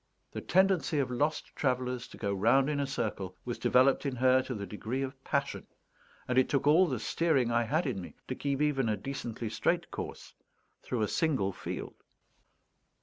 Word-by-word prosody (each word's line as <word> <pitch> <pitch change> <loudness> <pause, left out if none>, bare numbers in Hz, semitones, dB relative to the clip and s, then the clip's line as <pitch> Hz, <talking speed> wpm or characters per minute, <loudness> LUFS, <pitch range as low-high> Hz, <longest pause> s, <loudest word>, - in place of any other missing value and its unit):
The - - -5
tendency 190 -4 +2
of 135 -3 0
lost 145 +5 -1
travellers 125 -2 -1
to - - -13
go 100 -2 -1
round 120 +8 +3
in 145 - -1
a 140 - 0
circle 100 -8 -3
was 120 -1 -4
developed 130 +2 +4
in 140 -3 -2
her 130 +1 +4
to 130 -1 -5
the 100 -1 -4
degree 110 +7 -3
of 135 0 -7
passion, - - -2 0.6
and 125 0 +3
it 130 - +2
took 140 -1 +1
all 165 +6 +6
the 130 -5 -1
steering 135 0 +1
I 115 0 +3
had 155 +9 0
in 120 -9 -2
me 90 - -10
to - - -2
keep 140 +2 -1
even 135 -6 +1
a 105 - 0
decently 120 -4 -5
straight - - 0
course - - -7 0.5
through 120 -3 -2
a - - +1
single 135 -12 +1
field. - - -6
130 Hz, 190 wpm, -31 LUFS, 115-140 Hz, 0.6 s, all